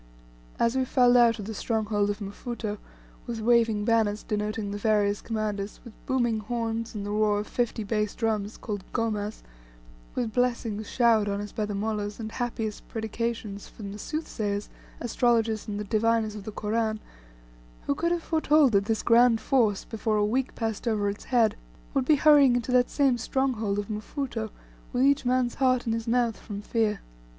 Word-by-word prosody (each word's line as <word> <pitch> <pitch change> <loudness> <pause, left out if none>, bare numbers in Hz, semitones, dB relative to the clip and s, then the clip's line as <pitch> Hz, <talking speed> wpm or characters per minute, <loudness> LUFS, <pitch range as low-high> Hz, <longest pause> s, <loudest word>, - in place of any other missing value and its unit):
As 235 +2 +2
we 260 - +2
filed 250 -1 +4
out 235 -2 +5
of 205 - -6
the 220 - -5
stronghold 210 -2 0
of 205 - -1
Mfuto, 210 +1 -5 0.5
with 235 -2 -3
waving 225 -2 +3
banners 220 -2 +2
denoting 210 0 -2
the 205 - -4
various 205 -1 +2
commanders, 210 -2 -3
with 235 - -11
booming 240 -5 +1
horns, 230 0 -3
and 200 -1 -4
the 205 - -3
roar 210 -1 +2
of - - -7
fifty 240 -2 -1
bass 210 0 -1
drums, 215 -2 -1
called 205 -3 -5
gomas 215 -2 -2 0.7
with 230 -3 -2
blessings 230 -4 -1
showered 225 -4 +3
on 200 0 -1
us 205 0 -6
by 215 -2 -2
the 205 - -3
mollahs, 210 0 -2
and 220 -1 -5
happiest 225 -3 -4
predications 220 -2 -4
from 200 -3 -8
the 205 - -8
soothsayers, 210 -9 -3 0.3
astrologers, 230 -2 +1
and 205 -1 -3
the - - -2
diviners 220 +1 +1
of 210 -2 -8
the 215 - -5
Koran 215 +1 -1 0.9
who - - +1
could 340 +4 0
have 345 -1 0
foretold 310 -4 +3
that 200 -1 +3
this 220 0 -1
grand 235 0 +5
force, 220 -7 +1
before 220 -1 -1
a 205 - +3
week 250 +5 -1
passed 225 0 -3
over 210 -3 +1
its 205 - -10
head, 235 -4 +3 0.4
would 265 - +1
be 305 - +5
hurrying 285 -3 +6
into 245 +1 -1
that 250 0 +4
same 270 -4 +2
stronghold 230 -5 0
of 205 -1 -2
Mfuto, 220 +1 -4 0.4
with 250 +1 +2
each 280 0 +3
man's 250 -1 +2
heart 255 -2 +3
in 225 - 0
his 230 +1 -3
mouth 235 -1 +1
from 205 -2 -7
fear? 215 -2 0
225 Hz, 180 wpm, -27 LUFS, 210-240 Hz, 0.9 s, hurrying